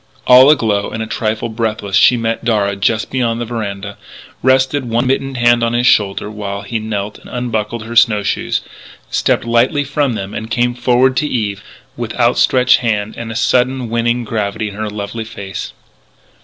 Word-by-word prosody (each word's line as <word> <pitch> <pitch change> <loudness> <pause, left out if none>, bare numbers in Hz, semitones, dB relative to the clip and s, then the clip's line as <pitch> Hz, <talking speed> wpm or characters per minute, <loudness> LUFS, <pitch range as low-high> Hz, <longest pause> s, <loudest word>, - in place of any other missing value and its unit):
All 130 +2 +8
aglow 110 -9 +2
and 110 0 -4
a - - -4
trifle 110 0 -2
breathless, 110 -3 -3
she 120 +4 +5
met 115 0 -2
Darragh 100 -4 0
just 110 +2 0
beyond 120 -3 0
the 120 - -3
veranda, 100 -3 -5 0.4
rested 130 +1 +2
one 120 +1 0
mittened 135 0 -1
hand 120 0 +4
on 115 0 0
his 120 +1 +1
shoulder 100 -4 +2
while 100 -1 -5
he 110 +3 -3
knelt 105 -1 -4
and - - -15
unbuckled 115 -2 -3
her 115 +1 -7
snow 110 -2 +4
shoes, - - -1 0.5
stepped - - +1
lightly 120 +5 +2
from 140 -2 -1
them 100 -2 -5
and 110 0 -5
came 120 +1 +1
forward 125 +1 +2
to 150 - +1
Eve 105 -7 -2 0.3
with - - -5
out - - +3
stretched 125 -1 +4
hand 110 -3 -1
and 115 -1 -6
a - - -6
sudden 125 0 +1
winning 120 +1 0
gravity 110 -1 -3
in - - -10
her 110 +1 -4
lovely 105 +2 -5
face. 100 -3 -7
115 Hz, 185 wpm, -16 LUFS, 105-125 Hz, 0.5 s, All